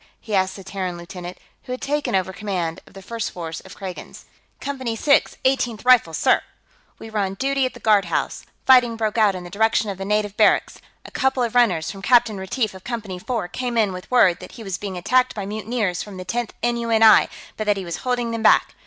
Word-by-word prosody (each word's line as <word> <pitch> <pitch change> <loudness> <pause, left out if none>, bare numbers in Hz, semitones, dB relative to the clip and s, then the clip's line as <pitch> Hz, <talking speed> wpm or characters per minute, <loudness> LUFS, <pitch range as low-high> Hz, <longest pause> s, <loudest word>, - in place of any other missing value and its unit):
he 220 - -8
asked 190 -1 +1
the 195 - -10
Terran 185 -2 -4
lieutenant 175 +1 -8 0.3
who - - -8
had 255 - -5
taken 290 -6 -1
over 190 0 0
command 180 -5 -3
of - - -18
the 195 - -10
first 230 +3 -4
force 165 -2 -6
of - - -13
Kragans. 190 -3 -8 0.3
"Company 260 -5 -3
6, 280 +5 +2
Eighteenth 245 -4 0
Rifles, 240 -11 +5
sir. - - +3 0.6
We 225 - -10
were 215 - -1
on 195 -1 -1
duty 270 +3 +1
at - - -10
the - - -10
guardhouse; 210 -3 +1 0.2
fighting 250 -3 +6
broke 220 0 -1
out 205 -3 +4
in 180 - -6
the 175 - -10
direction 220 0 +1
of 190 - -8
the - - -3
native 210 0 0
barracks. - - +3 0.3
A - - -11
couple 265 -1 +1
of 235 - -2
runners 190 -10 +2
from 195 - -10
Captain 225 -1 +3
Retief 205 +3 -2
of 190 0 -12
Company 215 -7 -5
4 225 -1 -3
came 245 +3 -3
in 210 -4 +2
with 180 0 -9
word 190 -9 +4
that - - -11
he 235 - -10
was 195 -3 -4
being 195 -3 -5
attacked 255 +8 +2
by 205 -2 -4
mutineers 210 -3 -2
from 205 -3 -8
the 185 - -7
Tenth 235 +4 -3
N.U.N.I. 230 -2 +5 0.3
but 215 - -4
that 205 -1 +3
he 190 - -5
was 170 - -4
holding 245 -2 -1
them 230 -1 -3
back. - - +4
215 Hz, 225 wpm, -22 LUFS, 190-240 Hz, 0.6 s, fighting